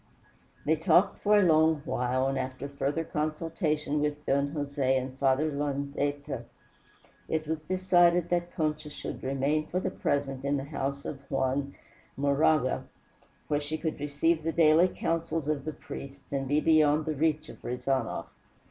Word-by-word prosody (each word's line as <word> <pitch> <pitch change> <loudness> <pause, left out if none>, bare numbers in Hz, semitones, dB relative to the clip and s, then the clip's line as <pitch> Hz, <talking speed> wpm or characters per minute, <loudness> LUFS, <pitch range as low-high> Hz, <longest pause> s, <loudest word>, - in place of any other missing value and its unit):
They 160 +2 +3
talked 170 +4 +3
for 210 0 +5
a 205 - +5
long 160 -3 +4
while, 130 -1 0
and 135 0 0
after 130 +1 -3
further 140 +3 -2
consultation 155 -1 -1
with 150 0 -2
Don 140 +1 +2
Jose 140 -3 0
and 130 0 -4
Father 140 +3 +2
Landaeta, 145 0 -2 0.8
it 155 -1 -1
was 160 0 -2
decided 175 0 +3
that 175 0 0
Concha 155 -1 -1
should 150 - -6
remain 140 +3 0
for 180 - -1
the 185 - -2
present 135 -5 -1
in 140 +1 +1
the 135 - -3
house 140 -1 -4
of 135 - -5
Juan 135 +1 -1 0.4
Moraga, 140 0 +2 0.6
where 145 - +1
she 150 +2 -3
could 160 -1 -3
receive 150 +3 +1
the 165 +1 -1
daily 160 +2 +5
counsels 165 -3 -2
of 150 -2 -1
the 155 - -2
priests, 140 -1 -9
and 135 -1 -1
be 145 +3 +3
beyond 155 -1 +4
the 155 - -1
reach 155 +1 0
of - - -12
Rezanov. 125 0 -1
150 Hz, 155 wpm, -29 LUFS, 140-160 Hz, 0.8 s, for